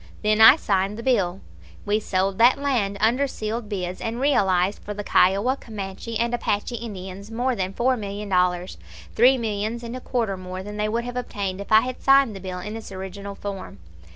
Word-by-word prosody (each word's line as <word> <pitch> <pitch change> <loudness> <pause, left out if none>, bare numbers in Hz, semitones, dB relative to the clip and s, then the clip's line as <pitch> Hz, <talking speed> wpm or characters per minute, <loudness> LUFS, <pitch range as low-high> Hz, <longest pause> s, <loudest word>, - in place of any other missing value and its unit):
Then 215 +1 +3
I 225 +5 +10
signed 200 -7 0
the 230 - -7
bill. 195 -8 +1 0.4
We 210 +1 +1
sold 195 -1 -1
that 240 +2 +6
land 245 -9 0
under 245 +7 +2
sealed 220 -2 -4
bids, 185 -3 -4
and 225 +1 -3
realized 195 -8 +2
for 210 - -7
the 205 - -5
Kiowa, 200 +8 +3
Comanche, 215 -1 -6
and 235 +1 0
Apache 235 0 -1
Indians 200 -3 -8
more 245 +3 -1
than 190 -2 -2
four 250 +6 +1
million 205 -2 -5
dollars 180 -1 0 0.3
three 255 +3 +5
millions 220 0 -3
and 235 +1 -6
a 255 - -6
quarter 225 -7 -1
more 185 0 -7
than 210 +1 -7
they 210 0 0
would 230 +2 -1
have 245 +1 -5
obtained 200 -5 -3
if 200 - -10
I 220 0 +8
had 255 +1 -5
signed 275 -5 +4
the - - -7
bill 185 -1 -6
in 210 +4 -6
its 225 -2 -8
original 195 +1 -7
form. 195 - -7
210 Hz, 200 wpm, -24 LUFS, 195-235 Hz, 0.4 s, I